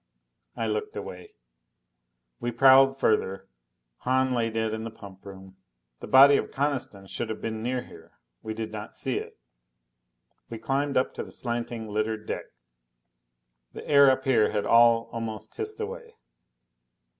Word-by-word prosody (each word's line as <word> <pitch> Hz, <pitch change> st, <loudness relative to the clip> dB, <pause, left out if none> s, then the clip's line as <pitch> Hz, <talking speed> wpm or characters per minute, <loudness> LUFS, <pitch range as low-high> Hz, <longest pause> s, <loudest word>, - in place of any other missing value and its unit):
I 115 Hz, -, -2 dB
looked 105 Hz, -1 st, -3 dB
away. 90 Hz, -3 st, -8 dB, 1.0 s
We 120 Hz, -, -2 dB
prowled 135 Hz, +2 st, +6 dB
further. 95 Hz, -5 st, 0 dB, 0.5 s
Hahn 130 Hz, +1 st, +1 dB
lay 115 Hz, -2 st, 0 dB
dead 110 Hz, -1 st, -2 dB
in 110 Hz, 0 st, -4 dB
the 115 Hz, -, -5 dB
pump 100 Hz, -4 st, -13 dB
room. 95 Hz, -1 st, -12 dB, 0.4 s
The -, -, -8 dB
body 140 Hz, +2 st, +8 dB
of -, -, -3 dB
Coniston 135 Hz, -8 st, -3 dB
should 110 Hz, +4 st, -5 dB
have 110 Hz, -, -4 dB
been 110 Hz, -1 st, -4 dB
near 125 Hz, +1 st, -2 dB
here. -, -, -16 dB, 0.3 s
We 110 Hz, 0 st, -5 dB
did 110 Hz, -1 st, -5 dB
not 105 Hz, -1 st, -8 dB
see -, -, -1 dB
it. -, -, -10 dB, 1.1 s
We 115 Hz, -, -6 dB
climbed 140 Hz, +5 st, -1 dB
up 130 Hz, -, +1 dB
to -, -, -5 dB
the -, -, -12 dB
slanting, 120 Hz, -2 st, -4 dB
littered 110 Hz, +1 st, -2 dB
deck. -, -, -4 dB, 1.3 s
The -, -, -9 dB
air 140 Hz, -2 st, +7 dB
up 130 Hz, 0 st, +1 dB
here 120 Hz, -5 st, +3 dB
had 105 Hz, -1 st, -2 dB
all 115 Hz, 0 st, +5 dB
almost 115 Hz, -2 st, -6 dB
hissed 430 Hz, 0 st, -5 dB
away. 470 Hz, +1 st, -7 dB
115 Hz, 155 wpm, -26 LUFS, 110-130 Hz, 1.3 s, body